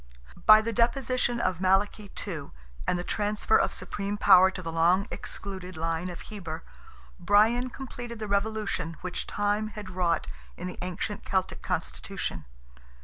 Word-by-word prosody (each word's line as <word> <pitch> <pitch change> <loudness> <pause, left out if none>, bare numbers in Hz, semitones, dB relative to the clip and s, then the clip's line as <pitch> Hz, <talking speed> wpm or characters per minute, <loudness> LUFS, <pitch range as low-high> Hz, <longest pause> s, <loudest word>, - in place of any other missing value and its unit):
By 215 0 +10
the 230 +1 -2
deposition 240 +1 +1
of 185 -6 0
Malachy 195 +2 +2 0.2
II., 165 -8 -5 0.4
and 180 - +2
the 175 - -3
transfer 210 +3 +1
of - - +2
supreme 200 +1 -4
power 190 -2 +7
to 185 -1 -7
the 165 - -4
long 175 +4 +3
excluded 185 -2 -7
line 165 +2 -1
of 175 - -7
Heber, 170 -7 -7 0.6
Brian 215 +7 +4
completed 245 -2 -7
the 215 -1 -4
revolution 200 -5 -1
which 180 -1 -4
Time 205 +1 0
had 210 -2 -8
wrought 175 -3 +1 0.3
in 180 - -6
the 180 - -6
ancient 185 +3 -3
Celtic 190 -1 -1
constitution. 80 - -3
200 Hz, 145 wpm, -28 LUFS, 180-215 Hz, 0.6 s, By